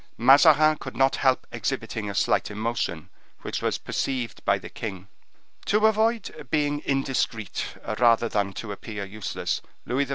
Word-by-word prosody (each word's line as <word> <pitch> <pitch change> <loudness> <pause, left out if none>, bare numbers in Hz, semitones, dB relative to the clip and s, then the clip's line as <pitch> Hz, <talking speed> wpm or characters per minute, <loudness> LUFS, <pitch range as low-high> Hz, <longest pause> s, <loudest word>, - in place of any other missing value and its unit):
Mazarin 155 +4 +6
could 130 - -8
not 135 0 +3
help 130 -1 +2
exhibiting 105 -2 -3
a 100 - -5
slight - - +2
emotion, 105 -6 -3 0.3
which - - -3
was - - 0
perceived 125 -4 -3
by - - +3
the - - -9
king. 95 -4 -7 0.6
To 210 +1 +3
avoid 220 - +1
being 145 0 +1
indiscreet, 135 -6 -1 0.2
rather 115 -1 +4
than 100 -3 -1
to 105 +2 -6
appear 100 0 -6
useless, 105 +1 -3 0.2
Louis 135 +3 0
XIV. - - -15
125 Hz, 150 wpm, -25 LUFS, 105-145 Hz, 0.6 s, Mazarin